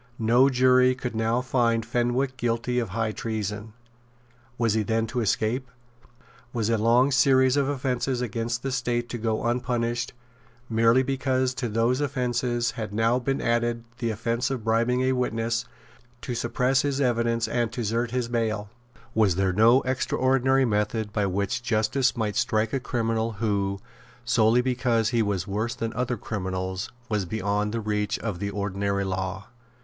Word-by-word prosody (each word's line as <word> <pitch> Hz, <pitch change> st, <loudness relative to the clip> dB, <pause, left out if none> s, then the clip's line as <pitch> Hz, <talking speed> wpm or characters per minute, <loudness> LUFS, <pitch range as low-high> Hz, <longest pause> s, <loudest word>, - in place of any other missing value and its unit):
No 120 Hz, +4 st, +4 dB
jury 130 Hz, 0 st, +4 dB
could 125 Hz, -2 st, -5 dB
now 115 Hz, +2 st, +1 dB
find 120 Hz, -3 st, +1 dB
Fenwick 120 Hz, +3 st, 0 dB
guilty 120 Hz, 0 st, -1 dB
of 115 Hz, -4 st, -2 dB
high 110 Hz, +2 st, -1 dB
treason. 105 Hz, -1 st, -4 dB, 0.8 s
Was 115 Hz, -3 st, +2 dB
he 110 Hz, -, +2 dB
then 110 Hz, +2 st, 0 dB
to 115 Hz, +3 st, -3 dB
escape? 115 Hz, +3 st, 0 dB, 0.8 s
Was 115 Hz, -2 st, 0 dB
a 115 Hz, -, +3 dB
long 120 Hz, +5 st, +4 dB
series 130 Hz, -1 st, +4 dB
of 140 Hz, -1 st, +1 dB
offences 130 Hz, -2 st, -1 dB
against 115 Hz, 0 st, -2 dB
the 135 Hz, -, -2 dB
State 120 Hz, -1 st, -1 dB
to 120 Hz, -, -4 dB
go 110 Hz, -1 st, -1 dB
unpunished 120 Hz, 0 st, -1 dB, 0.5 s
merely 115 Hz, +2 st, +4 dB
because 130 Hz, -1 st, 0 dB
to 125 Hz, -2 st, -3 dB
those 115 Hz, +5 st, +1 dB
offences 125 Hz, -3 st, 0 dB
had 110 Hz, -2 st, -5 dB
now 115 Hz, +3 st, +2 dB
been 135 Hz, +2 st, -1 dB
added 120 Hz, 0 st, 0 dB, 0.2 s
the 120 Hz, -2 st, -1 dB
offence 115 Hz, +3 st, -1 dB
of 130 Hz, -4 st, -3 dB
bribing 115 Hz, +3 st, +2 dB
a 130 Hz, -, +2 dB
witness 115 Hz, -2 st, -1 dB, 0.6 s
to 125 Hz, -, -4 dB
suppress 125 Hz, +3 st, +1 dB
his 140 Hz, -1 st, -1 dB
evidence 115 Hz, -3 st, +1 dB
and 120 Hz, -2 st, -1 dB
to 120 Hz, -, -3 dB
desert 115 Hz, +2 st, -1 dB
his 125 Hz, 0 st, -1 dB
bail? 110 Hz, -3 st, -2 dB, 0.4 s
Was 105 Hz, -5 st, +3 dB
there 95 Hz, 0 st, +1 dB
no 115 Hz, +6 st, +5 dB
extraordinary 130 Hz, +1 st, +2 dB
method 105 Hz, -1 st, -1 dB
by 105 Hz, -1 st, +1 dB
which 100 Hz, +6 st, -1 dB
justice 120 Hz, +3 st, +1 dB
might 105 Hz, -3 st, -1 dB
strike 110 Hz, 0 st, +1 dB
a 135 Hz, -, +1 dB
criminal 115 Hz, -3 st, -1 dB
who, 100 Hz, -2 st, -1 dB, 0.5 s
solely 120 Hz, 0 st, +4 dB
because 120 Hz, -3 st, +1 dB
he 120 Hz, -2 st, +1 dB
was 100 Hz, -4 st, -1 dB
worse 110 Hz, +4 st, -2 dB
than 115 Hz, -2 st, -3 dB
other 125 Hz, 0 st, -1 dB
criminals, 95 Hz, -2 st, -4 dB, 0.2 s
was 105 Hz, -5 st, -1 dB
beyond 105 Hz, +2 st, -1 dB
the 115 Hz, +1 st, -2 dB
reach 105 Hz, -1 st, -1 dB
of 105 Hz, -6 st, -4 dB
the 100 Hz, -, -2 dB
ordinary 100 Hz, 0 st, -1 dB
law? 95 Hz, +1 st, -3 dB
115 Hz, 160 wpm, -26 LUFS, 110-125 Hz, 0.8 s, no